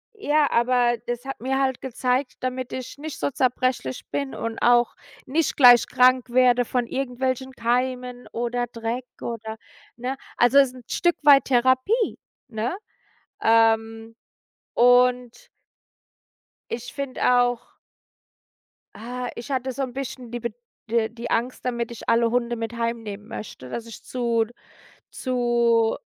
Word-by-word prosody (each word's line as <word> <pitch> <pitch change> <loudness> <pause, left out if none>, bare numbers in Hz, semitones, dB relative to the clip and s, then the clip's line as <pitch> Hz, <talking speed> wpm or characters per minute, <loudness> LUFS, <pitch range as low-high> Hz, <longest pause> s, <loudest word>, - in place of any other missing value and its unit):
Ja, 300 -7 +2
aber 240 0 +3
das 240 +1 -4
hat 270 - -6
mir 265 +2 0
halt 265 -2 0
gezeigt 255 0 -1
damit 255 0 -3
ich 255 +2 -6
nicht 310 0 -7
so - - -1
zerbrechlich 255 - -1
bin 140 -2 -3
und 230 0 -4
auch 240 0 +4 0.3
nicht 305 +4 0
gleich 245 -3 +8
krank 255 0 +4
werde 245 0 +4
von 245 +1 -1
irgendwelchen 260 +1 -2
Keimen 250 +1 -2
oder 240 +1 -2
Dreck 230 +1 -4 0.2
oder, 220 -1 -5 0.4
ne? 250 +2 -3 0.2
Also 245 +3 +5
es 275 - +6
ist 255 - -12
'n 250 - -12
Stück 345 -1 +1
weit 285 -2 +7
Therapie, 260 - +2 0.3
ne? 235 - -3 0.6
Ähm, 225 0 +2 0.6
und 250 - +3 1.2
ich 240 +1 -5
finde 280 -2 -5 0.2
auch 245 -1 +1 1.4
Ah, 245 +2 -5
ich 240 - -8
hatte 260 0 -1
so 275 - -5
'n 260 -2 -2
bisschen 260 -2 -6
die 240 - -4
Bed 235 -1 -4 0.3
äh, 225 0 +1
die 235 +1 -7
Angst 245 +3 -1
damit 235 -2 -2
ich 235 - -10
alle 230 0 +3
Hunde 240 0 0
mit 225 0 -5
heimnehmen 225 -3 -4
möchte, 130 -11 -8
dass 230 - -5
ich 230 - -11
zu 235 -2 0 0.7
zu 235 -3 +1
245 Hz, 140 wpm, -24 LUFS, 230-255 Hz, 1.4 s, gleich